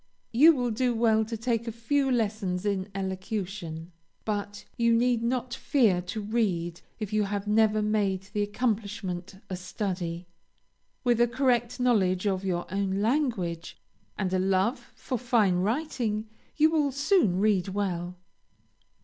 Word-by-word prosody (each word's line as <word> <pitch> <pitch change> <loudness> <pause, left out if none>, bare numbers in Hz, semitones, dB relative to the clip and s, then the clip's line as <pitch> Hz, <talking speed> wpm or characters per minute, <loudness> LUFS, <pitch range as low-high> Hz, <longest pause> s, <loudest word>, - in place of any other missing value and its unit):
You 300 +7 +7
will 245 -3 -1
do 245 +2 0
well 220 -1 +3
to 225 +1 -5
take 230 0 -1
a - - -1
few 270 +5 0
lessons 210 -6 -1
in 200 -1 -1
elocution, 185 -3 -4 0.3
but 205 -1 -3
you 235 0 +3
need 240 0 +2
not 245 +1 -1
fear 240 -8 +2
to 185 +5 -5
read 185 -6 -1 0.2
if 215 -2 -5
you 215 -1 +2
have 200 0 -3
never 215 0 +3
made 205 -3 0
the 210 - 0
accomplishment 205 -4 -2
a 185 - -4
study. 180 -2 -4 0.8
With 240 -2 +3
a 240 - +5
correct 240 -1 +1
knowledge 200 -7 +2
of 195 -2 0
your 175 -2 -1
own 195 -1 0
language, 220 - -1 0.4
and 190 -2 -1
a 185 - +2
love 195 +7 0
for 255 -2 -4
fine 230 -7 +2
writing, 220 - -1 0.3
you 310 +1 +5
will 300 -3 +2
soon 280 - +2
read 200 -3 +2
well. 180 -3 -2
210 Hz, 145 wpm, -28 LUFS, 190-240 Hz, 0.8 s, You